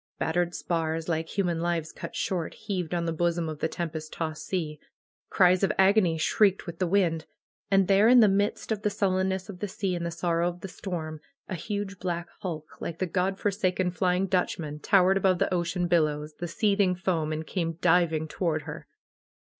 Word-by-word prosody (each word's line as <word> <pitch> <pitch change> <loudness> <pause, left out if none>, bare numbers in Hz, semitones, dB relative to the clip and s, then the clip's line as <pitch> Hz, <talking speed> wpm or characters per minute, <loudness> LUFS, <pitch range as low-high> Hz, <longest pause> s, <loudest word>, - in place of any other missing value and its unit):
Battered 175 +2 0
spars, 165 -1 -2
like 160 -1 -1
human 175 -4 +1
lives 170 -2 -1
cut - - -8
short, 175 -4 -2
heaved 180 -5 -3
on 170 -1 -1
the 165 - -1
bosom 170 0 0
of 155 -2 -5
the - - +1
tempest 160 -2 -5
tossed 155 -2 -4
sea. 155 -5 -2 0.5
Cries 180 -1 +4
of 195 - +3
agony 190 -3 +4
shrieked 200 +4 +2
with 170 -2 -7
the 185 - +1
wind. 170 -4 +1 0.4
And 195 -2 +4
there 195 +3 +5
in 250 +1 +8
the 220 - +7
midst 200 +3 0
of 215 -2 -1
the 210 - +1
sullenness 190 -1 0
of 195 -4 -9
the 205 - -2
sea, 195 -1 -2
and 175 -1 -3
the 170 - -1
sorrow 170 0 0
of 175 0 -9
the - - -5
storm, 160 -5 -5 0.3
a - - -5
huge 200 +2 -4
black 175 -1 -3
hulk, 160 -5 -6
like 165 - -4
the 185 - 0
God 185 +2 0
forsaken 185 -3 0
Flying 180 +1 +1
Dutchman, 170 -5 -1
towered 190 +2 +4
above 190 -1 +3
the 185 - 0
ocean 175 0 0
billows, 155 -3 +1
the 175 - -3
seething 200 0 +2
foam, 175 -4 -1
and 155 +1 -3
came 165 -1 -2
diving 165 -2 +2
to - - -13
ward 160 -3 +1
her. 150 0 -8
175 Hz, 195 wpm, -27 LUFS, 165-190 Hz, 0.5 s, in